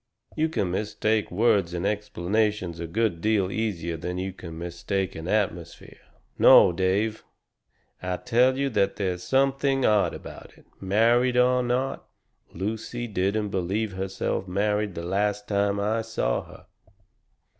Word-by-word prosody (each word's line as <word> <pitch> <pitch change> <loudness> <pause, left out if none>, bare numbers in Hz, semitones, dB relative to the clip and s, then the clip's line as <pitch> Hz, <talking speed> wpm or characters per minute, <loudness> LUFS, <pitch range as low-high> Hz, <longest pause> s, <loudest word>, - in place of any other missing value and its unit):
"You 160 +1 +1
can 100 - -1
mistake 110 +2 -1
words 95 -3 +2
and 85 +2 -2
explanations 105 -2 -1
a 85 - -4
good 100 -1 -1
deal 105 -3 +1
easier 85 -7 -2
than 90 +2 -4
you 95 +1 -3
can 85 -3 -9
mistake 85 +3 -3
an 80 +1 -7
atmosphere. 90 -5 -3 0.4
No, - - +8
Dave, 95 +5 0 0.8
I 90 0 -2
tell 125 +3 +2
you 140 0 0
that 100 -3 +1
there's 90 -3 -2
something 135 +2 +1
odd 105 -2 +3
about - - -11
it - - -21
married 120 +6 +2
or 125 0 +4
not, 125 +2 -2 0.4
Lucy 110 +6 -4
didn't 105 0 -1
BELIEVE 100 +3 -1
herself 95 0 -3
married 105 +1 0
the 85 - -5
last 105 +2 -1
time 100 0 +1
I 110 +3 0
saw 110 - -2
her." - - -15
100 Hz, 140 wpm, -26 LUFS, 90-110 Hz, 0.8 s, No